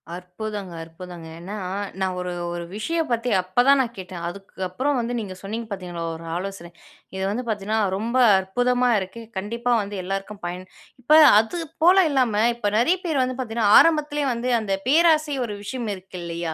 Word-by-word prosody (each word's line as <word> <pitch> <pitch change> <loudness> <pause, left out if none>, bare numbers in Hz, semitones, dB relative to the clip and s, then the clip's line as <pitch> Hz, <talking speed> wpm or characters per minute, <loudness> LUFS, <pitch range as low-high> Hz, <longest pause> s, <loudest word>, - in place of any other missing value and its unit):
அற்புதங்க! 185 +1 -6
அற்புதங்க! 165 0 -10
ஏன்னா 195 +5 -7 0.4
நான் 190 -1 -1
ஒரு 180 0 -3 0.2
ஒரு 175 0 -4
விஷயம் 325 +8 -1
பத்தி 235 +1 0
அப்பதான் 245 +10 +3
நான் 235 -2 -3
கேட்டேன். 180 -2 -7
அதுக்கு 195 +1 -8
அப்புறம் 265 +9 0
வந்து 235 +1 -2
நீங்க 195 -4 -6
சொன்னீங்க 220 +3 -5
பார்த்தீங்களா 180 -4 -5
ஒரு 165 +1 -10
ஆலோசனை! 190 -2 -6 0.4
இது 190 - -3
வந்து 245 +4 -3
பார்த்தீங்கன்னா 215 +1 -1 0.2
ரொம்ப 235 +5 -2 0.2
அற்புதமா 245 +6 +1
இருக்கு. 190 +5 -7
கண்டிப்பா 235 +5 -2
வந்து 205 +1 -6
எல்லோருக்கும் 195 +1 -5
பயன் 180 +1 -6 0.4
இப்ப 270 - -3 0.3
அது 225 +10 -2 0.3
போல 365 +2 +7
இல்லாம 230 -6 +2
இப்ப 210 -4 -1
நிறைய 340 +10 +3
பேர் 300 -5 +1
வந்து 255 0 -3
பார்த்தீங்கன்னா 225 -4 +1
ஆரம்பத்திலேயே 295 -3 +2
வந்து 240 +2 -2
அந்த 195 -2 -2 0.2
பேராசை 310 -1 +4
ஒரு 210 -3 -5
விஷயம் 230 +2 -4
இருக்கு 185 0 -11
இல்லையா? 170 -1 -4
210 Hz, 165 wpm, -23 LUFS, 185-250 Hz, 0.4 s, போல